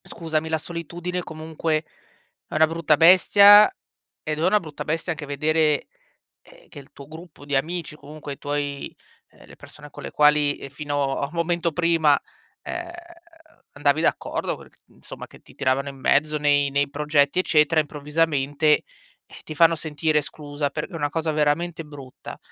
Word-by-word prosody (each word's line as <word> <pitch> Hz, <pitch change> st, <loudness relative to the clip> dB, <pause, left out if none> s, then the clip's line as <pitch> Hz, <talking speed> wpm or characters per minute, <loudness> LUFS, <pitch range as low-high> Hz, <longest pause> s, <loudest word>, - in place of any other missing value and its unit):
scusami, 160 Hz, -1 st, -4 dB
la 160 Hz, -, 0 dB
solitudine 175 Hz, +2 st, -5 dB
comunque 160 Hz, 0 st, -3 dB, 0.6 s
è -, -, -9 dB
una 155 Hz, +1 st, +5 dB
brutta 160 Hz, -2 st, +1 dB
bestia, 200 Hz, -, +7 dB, 0.5 s
ed 155 Hz, 0 st, -3 dB
è 165 Hz, -, -1 dB
una 210 Hz, +2 st, +3 dB
brutta 155 Hz, -3 st, -8 dB
bestia 165 Hz, +3 st, -2 dB
anche 150 Hz, -2 st, -7 dB
vedere, 150 Hz, +1 st, +1 dB, 0.5 s
ehm -, -, -20 dB
che 145 Hz, -, -11 dB
il 140 Hz, -, -16 dB
tuo 140 Hz, -, -13 dB
gruppo 160 Hz, -2 st, -13 dB
di 145 Hz, -1 st, -2 dB
amici, 160 Hz, +2 st, -2 dB
comunque 150 Hz, -1 st, -9 dB
i -, -, -12 dB
tuoi, 145 Hz, -1 st, -4 dB, 0.4 s
uhm, -, -, -19 dB
le -, -, -15 dB
persona 150 Hz, 0 st, -13 dB
con -, -, -12 dB
le -, -, -7 dB
quali, 150 Hz, -1 st, +3 dB
ehm, -, -, -9 dB
fino 145 Hz, -1 st, -2 dB
a 140 Hz, -, -2 dB
momento 170 Hz, 0 st, -1 dB
prima, 165 Hz, -3 st, +3 dB, 0.4 s
ehm, 345 Hz, -1 st, -6 dB, 0.8 s
andavi 145 Hz, +1 st, +1 dB
d'accordo -, -, -1 dB
co -, -, -14 dB, 0.2 s
insomma -, -, -11 dB
che -, -, -17 dB
ti -, -, -20 dB
tiravano 135 Hz, +2 st, 0 dB
in 135 Hz, -, -11 dB
mezzo 150 Hz, +3 st, +2 dB
nei 145 Hz, -1 st, +2 dB
nei 140 Hz, 0 st, 0 dB
progetti, 150 Hz, +2 st, +1 dB
eccetera, 155 Hz, -2 st, +3 dB
improvvisamente, 150 Hz, -1 st, -2 dB, 0.6 s
eh, -, -, -15 dB
ti 155 Hz, -, -8 dB
fanno 165 Hz, +1 st, +5 dB
sentire 155 Hz, 0 st, -1 dB
esclusa 145 Hz, -1 st, -5 dB
per 150 Hz, -, -4 dB
è -, -, -16 dB
una 145 Hz, -3 st, -1 dB
cosa 160 Hz, +1 st, -2 dB
veramente 155 Hz, +3 st, 0 dB
brutta. 140 Hz, -4 st, -11 dB
155 Hz, 165 wpm, -23 LUFS, 145-165 Hz, 0.8 s, bestia